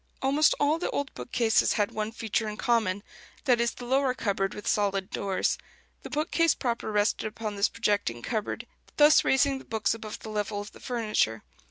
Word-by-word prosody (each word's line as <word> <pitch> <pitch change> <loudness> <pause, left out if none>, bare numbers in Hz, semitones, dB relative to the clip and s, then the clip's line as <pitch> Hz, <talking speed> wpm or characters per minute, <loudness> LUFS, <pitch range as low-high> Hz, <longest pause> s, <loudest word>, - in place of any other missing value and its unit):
Almost 285 +3 +4
all 300 +3 +2
the - - -2
old 285 -1 -3
bookcases 230 -3 +2
had 205 -1 0
one 215 0 -3
feature 225 -1 -2
in 210 - -6
common: 215 -5 +1 0.4
that 245 -4 +4
is, 235 - 0
the 245 - -8
lower 265 0 +2
cupboard 195 -4 -1
with 210 - -8
solid 195 -2 0
doors. 195 -2 0 0.4
The - - -8
bookcase 320 +1 +2
proper 235 -3 -2
rested 210 +1 +1
upon 215 -1 -5
this 200 +1 +2
projecting 205 - -1
cupboard, 220 -3 -3 0.3
thus 300 +1 +7
raising 270 0 +3
the - - -12
books 215 -2 0
above 220 -1 -7
the 220 - -9
level 210 -1 -2
of 205 0 -7
the - - -15
furniture. 215 - 0
220 Hz, 185 wpm, -28 LUFS, 205-255 Hz, 0.4 s, thus